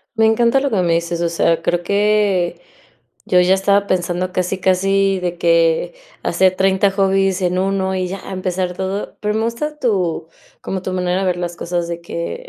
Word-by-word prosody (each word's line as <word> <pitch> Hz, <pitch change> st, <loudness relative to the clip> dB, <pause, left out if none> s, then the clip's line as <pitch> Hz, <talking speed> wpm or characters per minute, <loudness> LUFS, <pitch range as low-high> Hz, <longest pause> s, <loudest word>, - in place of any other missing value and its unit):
Me 220 Hz, -1 st, +4 dB
encanta 235 Hz, +4 st, +3 dB
lo 280 Hz, -, -1 dB
que 220 Hz, -, -1 dB
me 170 Hz, -1 st, +2 dB
dices, 170 Hz, 0 st, -1 dB
o 170 Hz, -, +1 dB
sea, 165 Hz, 0 st, +1 dB
creo 175 Hz, +1 st, 0 dB
que 200 Hz, -, +1 dB, 0.7 s
yo 180 Hz, -, +4 dB
ya 180 Hz, +1 st, +4 dB
estaba 200 Hz, +1 st, +2 dB
pensando 180 Hz, 0 st, -1 dB
casi 185 Hz, +1 st, -1 dB
casi 195 Hz, +1 st, +2 dB
de 175 Hz, -1 st, -3 dB
que 165 Hz, -, +2 dB, 0.3 s
hacer 185 Hz, -1 st, +2 dB
30 190 Hz, +1 st, +2 dB
hobbies 195 Hz, -1 st, +1 dB
en 180 Hz, 0 st, 0 dB
1 190 Hz, 0 st, 0 dB
y 185 Hz, -1 st, -1 dB
ya, 195 Hz, +1 st, -6 dB
empezar 185 Hz, -1 st, -2 dB
todo. 190 Hz, +2 st, -4 dB
Pero 210 Hz, 0 st, -1 dB
me 220 Hz, -, 0 dB
gusta 300 Hz, +7 st, -3 dB
tu 190 Hz, -, -1 dB, 0.4 s
como 190 Hz, -1 st, -4 dB
tu 185 Hz, -, -4 dB
manera 180 Hz, 0 st, 0 dB
de 195 Hz, -, -1 dB
ver 180 Hz, -1 st, +1 dB
las 175 Hz, -1 st, -4 dB
cosas 175 Hz, 0 st, -3 dB
de 170 Hz, 0 st, -5 dB
que 170 Hz, -, -6 dB
185 Hz, 190 wpm, -18 LUFS, 175-195 Hz, 0.7 s, Me